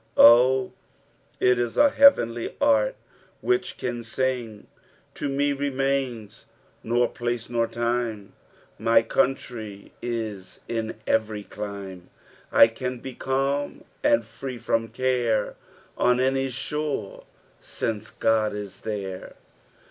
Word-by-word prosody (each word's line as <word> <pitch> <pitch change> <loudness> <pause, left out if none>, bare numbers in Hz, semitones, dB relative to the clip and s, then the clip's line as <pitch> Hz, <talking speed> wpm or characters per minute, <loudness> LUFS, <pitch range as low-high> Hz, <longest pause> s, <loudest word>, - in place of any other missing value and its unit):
Oh 125 +3 +7 0.7
I - - 0
it 125 -1 +4
is 120 -1 -2
a 290 -1 +6
heavenly 120 - +4
heart 285 - +3 0.5
which 375 0 0
can 120 -1 -4
sing 120 -3 -2 0.2
— - - -32
" - - -37
To 145 - -3
me 140 +1 +1
remains 135 -5 -2 0.3
nor 120 +1 +2
place 120 -1 -4
nor 115 -1 +1
Ume; 115 -3 -2 0.5
My 115 0 +4
canntry 115 -4 -2
li 110 -5 -4
In 115 -1 -3
erery 110 -2 0
clime; 100 -3 -7 0.4
I - - +8
oaa 125 +2 -5
be 130 +1 -7
culm 140 - -1 0.2
und 295 0 +4
[reu 130 -2 -7
Irom 115 0 -1
care 120 -4 0 0.5
On 125 0 +3
any 135 +1 +1
shore, 135 -3 -4 0.4
alnce 110 -1 -4
Qod 110 -2 +2
is 100 -2 -7
there. 95 -4 -5
120 Hz, 120 wpm, -25 LUFS, 110-135 Hz, 0.7 s, I